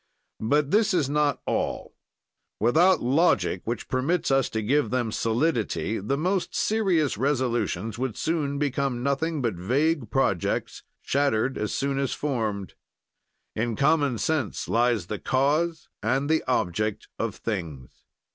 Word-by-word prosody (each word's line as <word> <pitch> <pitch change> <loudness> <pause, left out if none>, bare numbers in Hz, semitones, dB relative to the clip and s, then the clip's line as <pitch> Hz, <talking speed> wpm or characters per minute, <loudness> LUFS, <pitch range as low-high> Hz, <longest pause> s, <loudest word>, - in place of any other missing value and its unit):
"But 145 +6 +1
this 215 -2 +3
is 145 -5 +1
not 150 -1 +1
all; - - -2 0.6
without 165 - +4
logic, 120 - +2
which 115 0 -3
permits 140 +6 0
us 135 -2 +3
to 110 -1 -2
give 145 +7 +2
them 120 -3 -1
solidity, 115 -2 0
the 110 +8 -1
most 180 +2 -1
serious 180 - +1
resolutions 120 -6 -1
would 130 -4 -2
soon 150 -4 -1
become 140 -3 -1
nothing 140 +2 0
but 115 -3 +1
vague 130 - 0
projects, 100 -10 0 0.2
shattered 135 -3 +1
as 105 - -2
soon 140 0 -1
as 135 -2 -1
formed. 110 - -2 0.8
"In 115 +1 -1
common 140 -2 +2
sense 145 -3 -1
lies 115 -5 +2
the 105 +3 -5
cause 150 +5 0
and 130 +6 0
the 160 - +2
object 105 -2 -1
of 115 -2 -2
things. 80 - -6
130 Hz, 135 wpm, -26 LUFS, 110-150 Hz, 0.8 s, without